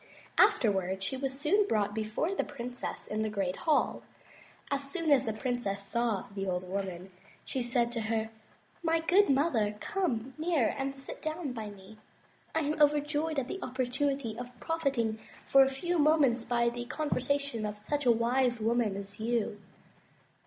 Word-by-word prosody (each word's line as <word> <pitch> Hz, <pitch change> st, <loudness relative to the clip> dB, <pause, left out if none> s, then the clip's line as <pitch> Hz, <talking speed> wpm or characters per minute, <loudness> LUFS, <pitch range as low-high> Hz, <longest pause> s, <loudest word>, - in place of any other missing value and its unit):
Afterward 190 Hz, -, +3 dB
she 195 Hz, -, -1 dB
was 270 Hz, +2 st, -3 dB, 0.2 s
brought 205 Hz, -1 st, +1 dB
before 220 Hz, -, -1 dB
the -, -, 0 dB
princess 250 Hz, -3 st, -6 dB
in 215 Hz, +1 st, -2 dB
the 220 Hz, -, 0 dB
great 195 Hz, -3 st, -1 dB
hall. 310 Hz, -3 st, +1 dB, 0.7 s
As 275 Hz, 0 st, -1 dB
soon 330 Hz, -4 st, 0 dB
as 265 Hz, -5 st, +5 dB
the -, -, +2 dB
princess 215 Hz, -3 st, -2 dB
saw 235 Hz, -2 st, 0 dB
the 195 Hz, -1 st, -3 dB
old 180 Hz, 0 st, -2 dB
woman, 190 Hz, -1 st, -4 dB, 0.3 s
she 260 Hz, -, -2 dB
said 240 Hz, -1 st, +1 dB
to 235 Hz, -1 st, -2 dB
her: 220 Hz, 0 st, -1 dB, 0.5 s
"My 330 Hz, -1 st, +2 dB
good 370 Hz, +5 st, +4 dB
mother, 265 Hz, -7 st, +2 dB
come 265 Hz, -, -1 dB
near 315 Hz, -8 st, +2 dB
and 275 Hz, 0 st, -2 dB
sit 270 Hz, 0 st, -8 dB
down 310 Hz, -3 st, -3 dB
by 220 Hz, -3 st, -5 dB
me. 205 Hz, +1 st, -13 dB, 0.6 s
I 320 Hz, -, +3 dB
am 305 Hz, +1 st, -1 dB
over 295 Hz, 0 st, +6 dB
joyed 300 Hz, +1 st, -2 dB
at 260 Hz, -2 st, 0 dB
the 385 Hz, -, -5 dB
opportunity 255 Hz, -1 st, -1 dB
of 245 Hz, -1 st, -8 dB
profiting 270 Hz, -9 st, 0 dB, 0.3 s
for 275 Hz, -, +6 dB
a 265 Hz, -, +2 dB
few 345 Hz, +6 st, -1 dB
moments 290 Hz, -6 st, +4 dB
by 235 Hz, -1 st, +2 dB
the 240 Hz, 0 st, -5 dB
conversation 280 Hz, -3 st, -1 dB
of 210 Hz, 0 st, -3 dB
such 285 Hz, +6 st, -2 dB
a -, -, +8 dB
wise 240 Hz, +1 st, +2 dB
woman 225 Hz, -2 st, +1 dB
as 200 Hz, +1 st, -7 dB
you." 225 Hz, -2 st, -1 dB
245 Hz, 165 wpm, -31 LUFS, 215-285 Hz, 0.7 s, a